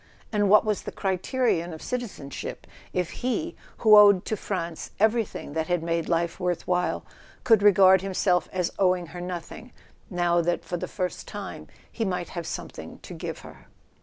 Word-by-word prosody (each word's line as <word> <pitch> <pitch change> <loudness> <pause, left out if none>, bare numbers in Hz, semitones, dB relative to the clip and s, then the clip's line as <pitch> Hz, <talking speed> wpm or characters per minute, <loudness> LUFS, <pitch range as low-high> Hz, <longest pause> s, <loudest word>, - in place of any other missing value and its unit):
And 205 -2 +2
what 210 +2 +6
was 210 -2 0
the - - -6
criterion 190 -2 0
of 160 - -9
citizenship, 215 - -5 0.3
if 180 -2 -1
he, 315 +7 -1 0.2
who 215 -2 +7
owed 205 -3 +7
to 220 - -1
France 170 -5 -4
everything 220 -7 0
that 160 0 -1
had 175 -2 0
made 165 -1 -1
life 170 0 0
worth 180 -2 -1
while, 180 0 0 0.4
could 225 -4 +5
regard 190 -2 +6
himself 185 -2 +1
as 180 -2 -1
owing 185 -2 +2
her 175 - -6
nothing, 180 +7 -7 0.4
now 175 -2 +2
that 175 +1 -1
for 175 - -3
the - - -4
first 185 -2 -4
time - - -7 0.2
he 230 - -3
might 180 -4 -2
have 170 -2 -5
something - - -7
to - - -9
give - - -6
her? - - -14
185 Hz, 170 wpm, -26 LUFS, 175-210 Hz, 0.4 s, who